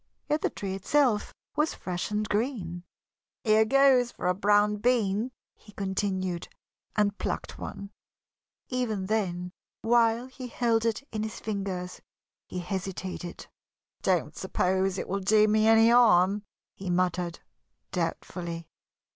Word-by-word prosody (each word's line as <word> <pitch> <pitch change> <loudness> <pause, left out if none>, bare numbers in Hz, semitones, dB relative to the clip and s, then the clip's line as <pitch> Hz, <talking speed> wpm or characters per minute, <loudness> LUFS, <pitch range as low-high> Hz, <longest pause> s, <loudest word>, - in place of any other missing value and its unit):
Yet 300 +1 +1
the - - +1
tree 195 -2 -5
itself 215 +3 +2 0.2
was 305 +1 +1
fresh 180 -1 -4
and 210 0 -1
green. 205 -7 -2 0.6
"Here 220 -1 +5
goes 260 -1 +5
for - - -7
a 180 - +3
brown 205 +2 +3
bean," 220 -1 +1 0.2
he 210 - -18
continued, 190 -3 -2 0.5
and 205 -1 +2
plucked - - -3
one. 200 0 -7 0.8
Even 230 -7 -1
then, 180 -4 -1 0.3
while 230 0 +3
he 260 0 -8
held 230 -2 +1
it 230 +3 0
in 215 - -3
his 220 0 -4
fingers, 195 -4 -4 0.5
he - - -6
hesitated. 185 -1 -5 0.6
"Don't - - +1
suppose 190 +1 0
it - - -3
will 195 - -1
do 210 +2 +4
me 215 +1 +3
any 225 0 +6
harm," 205 -4 +5 0.3
he 190 -1 -6
muttered, 180 -1 0 0.5
doubtfully. 170 -2 -3
205 Hz, 130 wpm, -28 LUFS, 185-225 Hz, 0.8 s, any